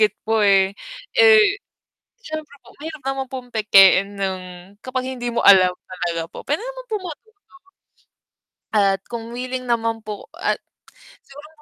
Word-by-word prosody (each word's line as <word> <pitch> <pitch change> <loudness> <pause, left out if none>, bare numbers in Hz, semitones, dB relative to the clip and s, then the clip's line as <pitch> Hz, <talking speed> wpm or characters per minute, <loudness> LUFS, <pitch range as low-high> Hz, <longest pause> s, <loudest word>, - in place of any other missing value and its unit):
it." 210 - +1
po, 220 -1 +2
eh. 195 -1 +4 0.4
Eh, 435 -4 +5 0.6
siyempre 310 -7 -7
po - - -18
mahirap 310 0 -8
naman 270 0 -2
pong 255 -2 -7
pekein 200 -1 +5
ng 190 -1 -2 0.4
kapag 255 0 -3
hindi 245 -2 -4
mo 235 - 0
alam 185 -2 +7 0.2
talaga 175 -2 -3
po, - - -10
puwede 295 +6 0
naman - - -7
pong 415 -4 -3
matuto. 415 +6 -14 1.4
At 195 -2 +3
kung 230 -1 -6
willing 255 +1 -4
naman 230 -1 0
po 210 -1 -7
at - - -1 0.7
siguro 290 +2 -13
240 Hz, 145 wpm, -21 LUFS, 200-300 Hz, 1.4 s, alam